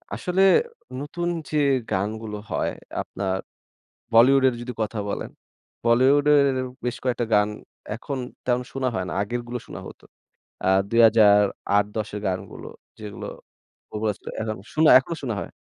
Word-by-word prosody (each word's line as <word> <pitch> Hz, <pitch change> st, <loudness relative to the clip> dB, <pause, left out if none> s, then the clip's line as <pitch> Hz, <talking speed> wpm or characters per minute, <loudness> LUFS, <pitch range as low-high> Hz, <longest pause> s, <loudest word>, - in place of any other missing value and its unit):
আসলে 180 Hz, +1 st, 0 dB, 0.6 s
নতুন 170 Hz, +5 st, -4 dB, 0.2 s
যে 155 Hz, -, -1 dB, 0.3 s
গানগুলো 105 Hz, +2 st, -2 dB
হয় -, -, 0 dB, 0.3 s
আপনার 95 Hz, -1 st, -3 dB, 0.8 s
বলিউডের 130 Hz, +2 st, +6 dB
যদি 125 Hz, +1 st, -5 dB
কথা 110 Hz, +1 st, -3 dB
বলেন, -, -, -4 dB, 0.5 s
বলিউডের 140 Hz, +4 st, +5 dB, 0.4 s
বেশ 125 Hz, 0 st, -2 dB
কয়েকটা 125 Hz, -2 st, 0 dB
গান 105 Hz, 0 st, +4 dB, 0.5 s
এখন 135 Hz, +4 st, -5 dB, 0.3 s
তেমন 125 Hz, 0 st, +1 dB
শুনা 135 Hz, -1 st, -1 dB
হয় 95 Hz, -, -1 dB
না। -, -, -4 dB
আগেরগুলো 120 Hz, +3 st, -4 dB
শোনা -, -, -8 dB
হত। -, -, -11 dB, 0.6 s
আ -, -, +2 dB, 0.2 s
২০০৮-১০ 105 Hz, -2 st, +4 dB
এর -, -, -4 dB
গানগুলো 95 Hz, -1 st, -4 dB, 0.3 s
যেগুলো, 105 Hz, -2 st, -7 dB, 0.6 s
popular 105 Hz, -1 st, -1 dB, 0.3 s
এখন 110 Hz, -1 st, -3 dB, 0.2 s
শুনা 155 Hz, 0 st, +5 dB
এখনো 130 Hz, +6 st, -4 dB
শোনা 120 Hz, -5 st, -2 dB
হয়। -, -, -7 dB
115 Hz, 125 wpm, -24 LUFS, 105-130 Hz, 0.8 s, বলিউডের